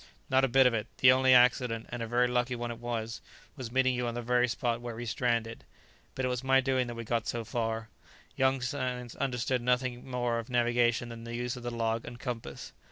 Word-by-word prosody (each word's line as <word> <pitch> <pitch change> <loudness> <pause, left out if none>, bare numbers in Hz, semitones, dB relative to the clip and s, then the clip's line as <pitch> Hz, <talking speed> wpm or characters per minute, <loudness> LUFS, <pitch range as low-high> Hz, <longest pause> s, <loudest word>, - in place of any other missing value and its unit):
"Not 130 0 +4
a - - +5
bit 135 +1 +5
of 125 - +4
it; 110 0 -2
the 125 - +7
only 130 0 +4
accident, 125 -2 +4
and 120 -1 -5
a 115 - -3
very 120 +2 +2
lucky 125 0 0
one 120 0 -4
it 115 - -8
was 115 -1 -4 0.3
was 130 -5 -7
meeting 130 0 +3
you 125 -1 -1
on 120 - -3
the 120 - -4
very 125 +1 +2
spot 120 0 -1
where 120 -1 -6
we 120 +1 -5
stranded. 115 -1 -1 0.5
But 130 - -1
it - - +1
was 125 0 -2
my 135 0 +4
doing 130 -1 +1
that 120 - -6
we 115 - -5
got 115 +1 -1
so 120 -1 -2
far. 115 -1 -3 0.5
Young 130 0 +2
Sands 125 -2 -3
understood 125 -1 -1
nothing 125 +1 -1
more 120 -2 0
of 115 - -7
navigation 120 -1 +2
than 115 -1 -8
the 115 0 -6
use 120 +2 -2
of 125 - -8
the 120 - -3
log 115 -1 -1
and 120 0 -9
compass. 120 -1 -6
120 Hz, 230 wpm, -30 LUFS, 115-125 Hz, 0.5 s, the